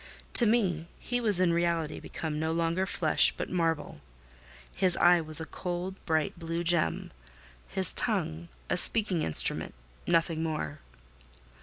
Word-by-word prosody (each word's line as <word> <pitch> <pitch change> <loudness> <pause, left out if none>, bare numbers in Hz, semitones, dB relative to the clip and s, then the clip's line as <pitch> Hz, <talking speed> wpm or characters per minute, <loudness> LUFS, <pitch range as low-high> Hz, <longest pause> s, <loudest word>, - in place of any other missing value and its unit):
To 235 - +7
me, 185 -8 0
he 245 0 -3
was 210 -6 +4
in 180 -2 +2
reality 170 -2 -1
become 155 -2 -5
no 160 +1 -1
longer 170 +3 -1
flesh, 160 -5 +3
but - - -5
marble; 165 - -2 0.7
his 185 -3 +2
eye 175 -1 +5
was 155 0 -2
a 160 - -5
cold, 180 +4 -5
bright, 160 +1 -1
blue 165 0 -4
gem; 170 -2 0 0.6
his - - +2
tongue 80 +2 0 0.2
a - - -1
speaking 205 -7 +3
instrument—nothing 80 - -2
more. 155 - -4
165 Hz, 135 wpm, -28 LUFS, 155-180 Hz, 0.7 s, To